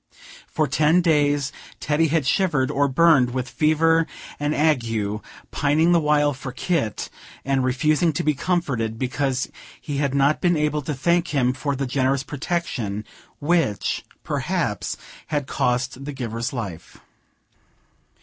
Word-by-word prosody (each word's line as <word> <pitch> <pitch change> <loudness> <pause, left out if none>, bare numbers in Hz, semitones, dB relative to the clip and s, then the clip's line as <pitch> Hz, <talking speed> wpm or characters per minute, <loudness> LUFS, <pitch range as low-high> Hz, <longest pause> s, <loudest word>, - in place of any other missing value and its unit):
For 155 - 0
ten 155 +6 +3
days, 145 -4 +2 0.3
Teddy 150 +2 +2
had 155 -2 +1
shivered 150 -4 +1
or 140 +1 +2
burned 135 -3 +4
with 130 0 -2
fever 160 +2 +2 0.3
and 145 +1 0
ague, 115 -9 0 0.3
pining 150 +4 +2
the 170 - +5
while 150 -1 +2
for 130 0 -7
Kit, 135 - -2 0.3
and 135 -1 +1
refusing 150 +6 +2
to - - -2
be 150 - +2
comforted, 125 -9 -1
because 130 +1 -1 0.3
he 145 -2 -4
had 140 -1 0
not 140 +2 +3
been 175 -2 +3
able 150 0 0
to 145 +1 -3
thank 170 +6 +1
him 125 -2 +2
for 140 +1 -2
the 135 +1 -2
generous 130 +1 +1
protection, 130 - -3 0.3
which, 150 - 0 0.2
perhaps, - - -2 0.3
had 145 -3 -1
cost 125 +1 -1
the 145 +1 -5
giver's 120 -1 -3
life. 100 -10 -6
140 Hz, 140 wpm, -23 LUFS, 130-155 Hz, 0.3 s, the